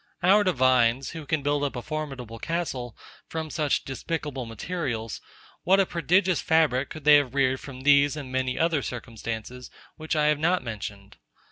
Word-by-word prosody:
Our 200 +4 +6
divines, 130 - +2
who 160 -3 -8
can 155 -2 0
build 145 0 +1
up 140 - -2
a 120 - -4
formidable 135 -7 -5
castle 135 -9 -3 0.3
from 160 -1 -5
such 150 -4 0
despicable 140 -2 -4
materials; 115 - -4 0.4
what 190 +2 +4
a 195 - +4
prodigious 180 +1 +1
fabric 150 -5 +2
could 155 - -9
they 150 0 +8
have 140 -2 -1
reared 130 -1 +2
from 130 -2 -9
these 140 +1 +4
and 135 -3 -7
many 130 -1 -1
other 165 -3 +2
circumstances, 120 0 -6 0.3
which 155 0 -3
I 150 -1 +2
have 150 -1 +2
not 175 0 +1
mentioned! 100 -3 -7
140 Hz, 165 wpm, -26 LUFS, 125-160 Hz, 0.4 s, they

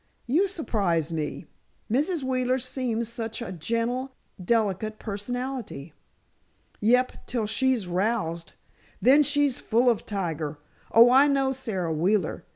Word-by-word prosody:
"You 325 +11 +2
surprise 195 - -1
me. 155 -2 -4 0.4
Mrs. 295 - 0
Wheeler 255 -1 +1
seems 245 -3 -2
such 225 -1 -4
a 235 - -5
gentle, 235 - -2 0.3
delicate 215 0 0
personality." 220 - -5 0.9
"Yep; 250 +4 +1
till 235 -3 -1
she's 240 -1 0
roused. 175 -3 -1 0.5
Then 275 +4 +6
she's 290 -2 +1
full 240 +2 +3
of 230 - -4
tiger! 165 -7 -3 0.3
Oh, 235 +2 +7
I 270 +3 +6
know 270 -2 +1
Sara 195 -11 -3
Wheeler. 180 +2 0
230 Hz, 120 wpm, -26 LUFS, 195-260 Hz, 0.9 s, Oh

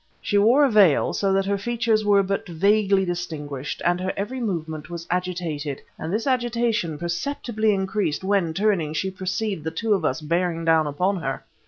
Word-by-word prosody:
She 205 - +1
wore 245 +8 +5
a 270 - +1
veil, 200 -9 +4
so 195 -1 0
that 195 0 +2
her 200 0 0
features 230 0 +1
were 200 -1 +4
but 195 +1 -2
vaguely 195 +3 +3
distinguished, 150 -6 -5
but 175 +1 +2
her 185 +1 -1
every 210 +7 -3
movement 160 - -4
was 170 -1 -6
agitated; 170 -6 -2 0.2
and 160 - -4
this 215 +3 -1
agitation 235 - 0
perceptibly 215 - -1
increased 190 -4 -1
when, 190 -5 +1
turning, 190 -7 +1
she 190 +4 -1
perceived 190 -1 -3
the 160 - -2
two 215 +7 0
of 190 -5 0
us 155 - 0
bearing 165 +1 -1
down 160 -2 +4
upon 180 +7 0
her. 135 -6 -4
190 Hz, 180 wpm, -23 LUFS, 165-210 Hz, 0.2 s, wore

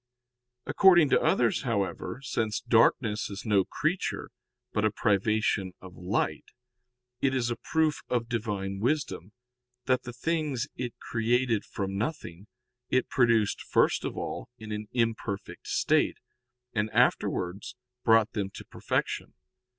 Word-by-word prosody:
According 175 -6 +6
to - - +5
others, 115 -3 +2
however, 115 +2 -2
since 110 -3 -1
darkness 115 -2 +2
is 100 -1 -7
no 100 -3 +4
creature, 165 +5 -2 0.4
but 105 - +1
a 110 - +4
privation 105 -2 +1
of 95 -1 -12
light, 90 +1 -1 0.8
it 135 -1 +2
is 120 -2 0
a - - -1
proof 160 +2 0
of 120 -2 0
Divine 100 -4 -3
wisdom, 105 - -1 0.5
that 130 -1 +2
the 120 - -7
things 145 0 -1
it 120 -1 -4
created 120 -1 +1
from 95 -2 -4
nothing 105 - -4 0.4
it 130 - +1
produced 115 -5 +2
first - - +2
of - - -4
all - - -5
in 110 -2 -9
an 105 0 -4
imperfect 115 -4 -2
state, - - +2 0.6
and 105 0 0
afterwards 100 +4 +1 0.3
brought 110 0 +5
them 100 -3 -2
to - - -9
perfection. - - -2
115 Hz, 130 wpm, -28 LUFS, 100-125 Hz, 0.8 s, According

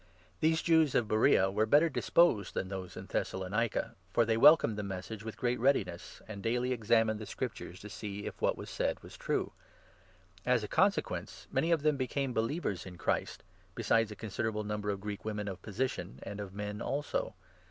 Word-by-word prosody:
These 160 +1 +2
Jews 160 -4 +4
of 115 - +3
Beroea 105 -3 +4
n - - -7
were 110 +2 +2
better 150 +8 +6
disposed 150 - +3
than 95 - -2
those 95 -2 -6
in - - -6
Thessalonica, 100 +4 -1 0.2
for 115 +4 +3
they 110 0 +2
welcomed 135 -3 +7
the 105 - -3
Message 100 +2 -6
with 110 -1 -6
great 125 0 0
readiness, 110 -9 0
and 105 -2 -7
daily 125 +3 0
ex 115 -4 -7
amined 115 -2 +4
the 110 - -7
Scriptures 110 -5 -5
to 105 - -8
see 105 0 -6
if - - -7
what - - +2
was - - -8
said - - -1
was - - -11
true. - - -1 0.9
As 125 -3 +2
a - - -3
12 - - -31
consequence, - - 0
many 145 +5 +1
of 160 -3 +2
them 150 -2 +3
became 130 0 -1
believers 115 - -1
in 90 -1 -9
Christ, - - -1 0.3
besides 115 -1 +2
a 105 - -7
considerable 110 +1 -2
number 105 0 -3
of 100 -1 -2
Greek 105 0 -5
women 105 -1 -3
of 95 -2 -5
position, 110 - -3
and 100 +1 -6
of 100 -2 -5
men 105 +1 -5
also. 140 +4 -2
110 Hz, 195 wpm, -32 LUFS, 100-125 Hz, 0.9 s, welcomed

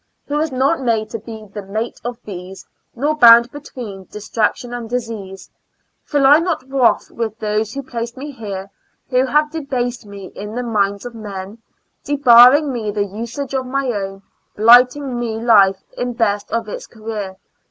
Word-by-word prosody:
Who 290 - -2
was 310 0 0
not 270 +4 +1
made 220 -3 0
to 230 - -4
be 220 0 -10
the 205 - -5
mate 215 +4 -5
of 240 0 -4
these, 190 -1 -9 0.3
Nor 290 +5 0
bound 235 -2 +8
between 240 -9 -9
distraction 215 +4 -2
and 235 -2 -6
disease. 220 -6 -5 0.5
Feel 285 -2 +1
I 290 +3 +7
not 330 -6 -2
wroth 265 -3 +2
with 220 -2 -4
those 215 0 -1
who 275 - -4
placed 235 -2 -5
me 290 +3 -6
here? 200 -6 -7 0.4
Who 255 +1 +3
have 300 +3 +2
debased 250 -7 -3
me 200 -2 -10
in 210 +2 -7
the 250 - -2
minds 200 -2 -1
of 245 - -7
men, 205 -1 -8 0.4
Debarring 275 +1 +6
me 225 -3 -3
the 205 0 -1
usage 235 +7 -6
of 260 -1 -2
my 270 0 -1
own, 195 -2 -5 0.3
Blighting 250 +4 +5
my 235 -2 -2
life 200 -5 +4
in 245 0 -3
best 205 -3 -1
of 230 -1 -1
its 210 - -7
career. 215 -4 -6
230 Hz, 170 wpm, -18 LUFS, 210-255 Hz, 0.5 s, bound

